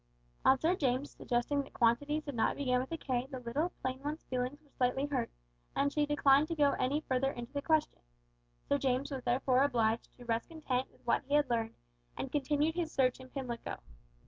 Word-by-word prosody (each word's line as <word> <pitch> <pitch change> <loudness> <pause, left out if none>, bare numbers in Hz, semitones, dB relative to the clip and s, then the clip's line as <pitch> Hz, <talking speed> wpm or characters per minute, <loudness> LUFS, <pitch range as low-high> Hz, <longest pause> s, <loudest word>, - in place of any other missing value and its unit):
On 265 - +6
Sir 330 +7 +2
James 270 -3 0
suggesting 245 +4 0
that 275 - -11
quantities 285 +7 +2
did 285 - -5
not 225 -2 +1
begin 250 -3 +2
with 260 - -7
a 330 - -2
K 255 -4 -2
the 265 - -5
little 280 +9 -1
plain 260 0 -2
one's 300 +3 -4
feelings 255 +3 -2
were 295 -3 -28
slightly 255 +2 +1
hurt, 290 -1 -1 0.5
and 285 0 +1
she 295 -1 +2
declined 290 0 +4
to 330 - -2
go 290 -2 +4
any 275 +4 +1
further 270 -2 0
into 240 0 -8
the 285 - -1
question. 315 0 +1 0.7
Sir 285 - +2
James 265 +1 0
was 265 -2 -4
therefore 255 +1 +2
obliged 230 -4 +1
to 245 - -12
rest 230 -1 -1
content 265 -6 -2
with - - -26
what - - +2
he 285 +2 +1
had 290 -4 +3
learned, 225 -1 0 0.4
and 265 - -4
continued 295 +2 +1
his 335 -2 -2
search 255 -2 +2
in 260 0 -11
Pimlico. 250 -4 -5
270 Hz, 205 wpm, -33 LUFS, 250-290 Hz, 0.7 s, On